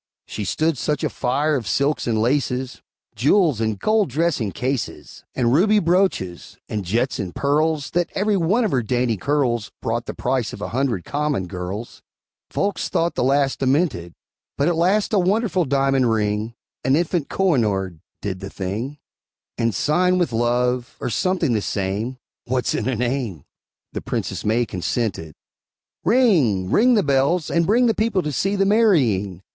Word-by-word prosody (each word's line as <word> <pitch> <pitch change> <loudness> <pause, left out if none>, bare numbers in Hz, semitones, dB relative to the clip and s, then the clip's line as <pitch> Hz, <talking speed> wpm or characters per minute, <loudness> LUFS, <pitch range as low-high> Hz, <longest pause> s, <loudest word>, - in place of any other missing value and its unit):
She 105 - -5
stood 155 - 0
such 150 -2 -1
a - - 0
fire 145 +5 0
of 120 -6 -3
silks 140 +4 0
and 110 -2 +1
laces, 125 +1 -1 0.3
Jewels 150 - +3
and 110 -2 0
gold 215 - +1
dressing 140 -7 0
cases, 130 +1 -4
And 120 -2 +2
ruby 205 +8 +4
brooches, 175 - 0
and 105 -2 -3
jets 115 +8 -1
and 90 -2 -5
pearls, 150 +1 0
That 175 0 0
every 205 +1 +1
one 195 +7 +2
of 210 - -1
her 130 - +2
dainty 120 0 0
curls 120 -1 0
Brought 115 +1 -2
the - - -5
price 125 -2 -1
of - - -9
a - - -4
hundred 120 -7 -1
common 145 -9 -1
girls; 90 +5 -6 0.5
Folks 200 0 -1
thought 170 +1 0
the - - -1
lass 135 +1 +2
demented! 130 - 0 0.4
But 140 - +2
at 175 - +2
last 190 +7 +1
a 205 - +4
wonderful 190 -1 +1
diamond 135 -2 +2
ring, 110 +1 -1 0.3
An 130 +1 +3
infant 170 -1 0
Kohinoor, 105 - 0 0.2
did 95 -2 -3
the 95 0 -7
thing, 105 +11 -4 0.6
And, 115 -1 0
sighing 180 - +2
with 175 -9 0
love, 120 +1 0
or 125 - -3
something 175 - +1
the 110 - +1
same, 100 +7 -2 0.3
(What's 125 0 0
in 115 - -1
a 130 - 0
name?) 120 - -2 0.5
The - - -4
Princess - - -3
May 115 +3 +1
consented. 90 -5 -3 0.7
Ring! 155 - +3
ring 245 +3 +5
the 205 - +3
bells, 140 +4 +1
and 170 -1 +2
bring 235 +5 +4
The 230 - +3
people 215 -4 0
to 150 - -2
see 195 +8 0
the 195 0 +2
marrying! 125 - +2
130 Hz, 165 wpm, -22 LUFS, 110-170 Hz, 0.7 s, ring